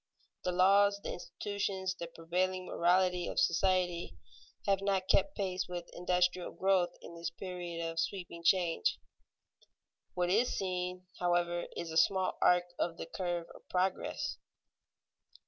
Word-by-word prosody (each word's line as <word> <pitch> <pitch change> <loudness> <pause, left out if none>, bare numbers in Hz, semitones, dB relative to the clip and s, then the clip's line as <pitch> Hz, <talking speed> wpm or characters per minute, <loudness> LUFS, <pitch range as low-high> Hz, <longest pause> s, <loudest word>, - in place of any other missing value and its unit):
The 180 - 0
laws, 200 +3 +5
the - - -3
institutions, 190 0 -3
the 170 -2 -6
prevailing 180 +3 -1
morality 180 0 +2
of - - -1
society, 175 0 +1 0.5
have 195 -1 +2
not 195 -1 0
kept 295 +8 +3
pace 185 -2 -1
with 175 -1 -6
industrial 180 0 +1
growth 190 -2 +2
in - - -9
this 170 0 -4
period 175 -1 -5
of 165 0 -3
sweeping 170 -1 -3
change. 175 - +3 1.2
What 180 0 +1
is 230 +6 +2
seen, 180 -1 -2
however, 175 -1 +1
is 170 -1 -4
a 160 - -1
small 185 +2 +3
arc 180 0 +5
of 165 -1 -1
the - - -5
curve 175 0 -3
of - - -17
progress. 185 +1 -1
180 Hz, 135 wpm, -33 LUFS, 175-190 Hz, 1.2 s, laws